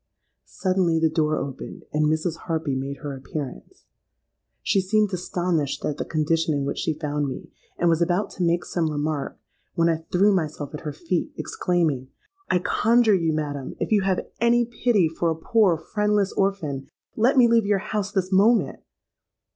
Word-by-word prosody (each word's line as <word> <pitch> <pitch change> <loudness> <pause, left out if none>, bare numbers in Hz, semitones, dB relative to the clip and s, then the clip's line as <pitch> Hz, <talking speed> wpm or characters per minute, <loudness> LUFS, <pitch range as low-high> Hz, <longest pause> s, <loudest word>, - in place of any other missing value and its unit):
Suddenly 185 -3 +1
the 160 -1 +2
door 155 -1 +1
opened, 135 -1 -6
and 150 0 +2
Mrs. 160 +2 0
Harpy 160 -4 -1
made 135 +1 -3
her 140 -1 -4
appearance. 140 - -7 0.8
She 195 - +2
seemed 210 +1 +1
astonished 175 -5 -1
at 150 - -2
the - - -3
condition 160 0 0
in 140 -1 -1
which - - -3
she 155 -2 -1
found 150 -2 -2
me, 130 - -7 0.3
and 175 - +1
was 165 0 +3
about 175 +4 +1
to 185 - -3
make 170 0 +1
some 165 -3 -1
remark, 150 -1 -2 0.4
when 170 0 +3
I 165 - +2
threw 200 +3 +4
myself 155 -5 -2
at 150 - -5
her 150 - -4
feet, 165 +4 -2
exclaiming, 160 -8 -1 0.4
'I 180 - +3
conjure 230 +1 +4
you, 165 -4 +2
madam—if 145 0 -3
you 210 -2 +4
have 190 -1 0
any 235 +1 +3
pity 230 -5 +2
for 165 +1 -1
a 160 - 0
poor 185 +1 +2
friendless 210 +4 0
orphan—let 195 - -1
me 245 -2 +7
leave 230 -3 +3
your 205 -1 +3
house 205 0 -3
this 190 -2 -1
moment!' 215 +5 +3
170 Hz, 170 wpm, -24 LUFS, 150-200 Hz, 0.8 s, me